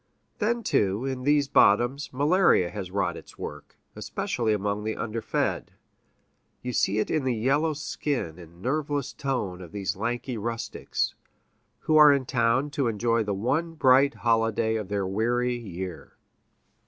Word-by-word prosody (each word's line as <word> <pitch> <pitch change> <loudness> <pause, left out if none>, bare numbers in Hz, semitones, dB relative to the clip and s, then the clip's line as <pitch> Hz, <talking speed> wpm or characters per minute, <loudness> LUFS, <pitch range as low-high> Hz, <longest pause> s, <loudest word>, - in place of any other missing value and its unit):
Then, 235 +2 0
too, 100 - +1
in 130 -1 -3
these 145 -1 +3
bottoms, 120 +3 +3
malaria 145 - +3
has 100 -4 -5
wrought 90 -3 -1
its - - -12
work, 75 0 -8 0.2
especially 115 -3 -2
among 105 0 -1
the 110 0 -2
underfed; 115 0 -2 0.9
you 125 0 -3
see 105 -1 +1
it 110 - 0
in 155 -3 +1
the 130 -2 0
yellow 140 +8 +1
skin 140 - -3
and 85 +1 -14
nerveless 145 +1 -1
tone 105 -10 -3
of 85 -3 -10
these 100 -2 -3
lanky 120 +3 -3
rustics, 115 +2 -3 0.7
who 155 - +3
are 150 -1 +9
in 140 -2 +1
town 120 +4 +1
to 140 -3 0
enjoy 115 +1 +1
the 105 -2 -2
one 160 - -1
bright 135 -1 +4
holiday 115 -1 +1
of 105 -3 -3
their 100 -1 -1
weary 120 +5 0
year. 95 -6 -7
115 Hz, 150 wpm, -26 LUFS, 100-140 Hz, 0.9 s, are